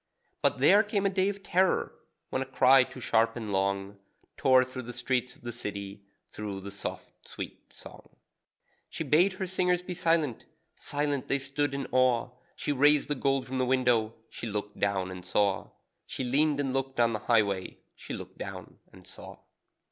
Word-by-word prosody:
But - - +2
there 205 - +6
came 205 -2 -1
a 195 - +3
day 190 0 +2
of 200 -1 -6
terror, 185 +1 +1 0.4
when 130 - -1
a - - -2
cry 130 0 +6
too 130 - -10
sharp 115 -1 +2
and 110 -4 -5
long 100 +1 -1 0.4
Tore 130 -3 +5
through 130 0 -7
the 120 0 -8
streets 125 0 -1
of - - -23
the 120 - -4
city, 100 -3 -6 0.3
through 100 -2 -5
the 100 +1 -7
soft, 100 - -8
sweet - - -8
song. - - -13 0.8
She - - -4
bade 180 +6 +4
her 190 0 -4
singers 180 -1 +1
be 180 - -5
silent 165 -7 0 0.3
silent 145 -2 -2
they 140 - +2
stood 140 +1 -2
in 140 -1 -3
awe; 130 -1 +2 0.2
She - - -2
raised 145 +1 +4
the - - +2
gold 135 -1 0
from 130 0 -3
the - - +2
window; 125 -4 +2
she 115 - -7
looked 105 -1 -5
down 95 -2 0
and 90 -1 -8
saw. 100 +1 0 0.4
(She - - -4
leaned 145 +4 +2
and 135 -2 -1
looked 135 -1 -2
on 115 -1 +4
the 110 - -2
highway, 100 -5 +2 0.2
She - - -7
looked - - -10
down - - -8
and - - -16
saw.) - - -11
130 Hz, 185 wpm, -29 LUFS, 110-145 Hz, 0.8 s, there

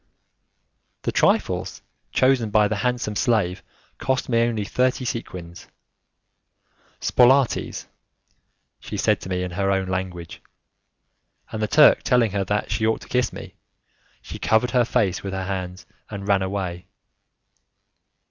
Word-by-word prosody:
The - - -1
trifles - - 0 0.3
chosen 130 -4 +2
by 105 0 +4
the 105 0 -2
handsome 125 -2 -1
slave 100 -5 +1 0.4
cost 130 -1 -1
me 115 -1 +3
only 115 -3 0
thirty 130 +3 0
sequins. 90 -8 -6 1.3
'Spolaitis', 130 0 +2 0.9
she - - -7
said - - +1
to - - -8
me 90 0 -1
in 90 - -4
her 95 +2 -1
own 95 -1 0
language, 90 -2 -5 1.1
and 110 - -4
the 105 - +1
Turk 150 +7 +6
telling 125 -5 +2
her 100 0 -1
that 105 +2 -2
she 110 - +1
ought 110 - 0
to - - -12
kiss 125 -1 +1
me, - - -10 0.7
she - - -8
covered 110 +2 +2
her 125 -2 +3
face 105 -7 0
with 95 -1 -5
her 95 0 -3
hands, 95 -1 -5 0.2
and 100 -2 -7
ran 100 -1 +3
away. 95 -2 -4
105 Hz, 140 wpm, -23 LUFS, 95-120 Hz, 1.3 s, Turk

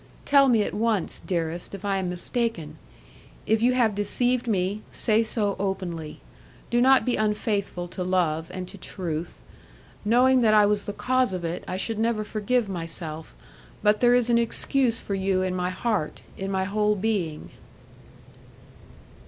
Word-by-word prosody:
Tell 275 -2 +5
me 225 -4 +4
at - - -4
once, 215 -3 0
dearest, 170 +1 -3
if 195 +1 -9
I 200 -1 +1
am 185 -2 -2
mistaken; 180 -4 -2 0.7
if 220 0 +2
you 250 +2 +4
have 235 -4 +2
deceived 245 +5 0
me, 200 0 0
say 220 0 +2
so 215 -3 -1
openly. 185 -5 -4 0.5
Do 240 0 +3
not 265 +1 +5
be 250 - +1
unfaithful 210 -4 -1
to 180 - -4
love 170 -3 0
and 185 -1 -6
to 200 - -11
truth. 170 -3 -5 0.6
Knowing 250 +4 +4
that 215 -2 +4
I 210 -1 +6
was 205 0 +1
the - - -3
cause 255 -1 +1
of 175 -2 -4
it, 165 +1 -4
I 185 - -3
should 220 +3 -2
never 225 -1 +1
forgive 215 +2 0
my 175 -4 -4
self, 160 -1 -7 0.5
but 210 0 +4
there 245 0 +5
is 245 -2 +3
an 235 - +4
excuse 235 +1 0
for 200 - -5
you 190 -1 +1
in 185 -1 -1
my 180 0 -1
heart, 190 -3 -2
in 195 0 -4
my 190 -1 0
whole 210 +2 +1
being." 190 -7 -2
205 Hz, 170 wpm, -25 LUFS, 180-230 Hz, 0.7 s, I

